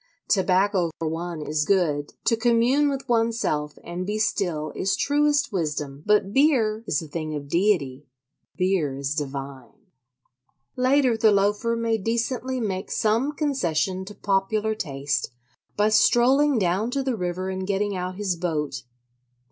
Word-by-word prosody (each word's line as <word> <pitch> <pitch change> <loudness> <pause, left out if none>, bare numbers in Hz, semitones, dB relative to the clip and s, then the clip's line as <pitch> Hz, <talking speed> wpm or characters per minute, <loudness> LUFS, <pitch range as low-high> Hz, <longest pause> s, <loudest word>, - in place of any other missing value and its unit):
Tobacco 190 -2 +2
for 165 - -3
one 165 0 -4
is 150 0 0
good; 150 -6 0
to 230 - +3
commune 240 +5 +3
with 275 -1 -4
oneself 225 -11 0
and 175 +1 -5
be 210 +3 -2
still 175 -8 -1
is 195 - 0
truest 290 -1 +1
wisdom; 150 -5 -3
but 210 -1 +3
beer 235 -7 +3
is 160 - 0
a - - -9
thing 155 0 -4
of 145 -1 -6
deity—beer 145 0 -1
is 140 +1 -2
divine. 140 - -7 0.8
Later 255 -1 +3
the 220 -1 +4
Loafer 205 +3 +1
may 230 -1 0
decently 235 +4 -2
make 195 -4 -3
some 230 +7 +1
concession 190 - -1
to 205 +1 -10
popular 210 +2 0
taste 140 -8 -2 0.5
by 210 +1 +3
strolling 255 +6 +4
down 195 +3 +1
to 275 +2 -1
the 260 -2 -1
river 180 -1 -3
and 190 0 -4
getting 205 0 0
out 185 0 -4
his 195 -2 -1
boat. 150 -6 -2
195 Hz, 140 wpm, -24 LUFS, 155-230 Hz, 0.8 s, the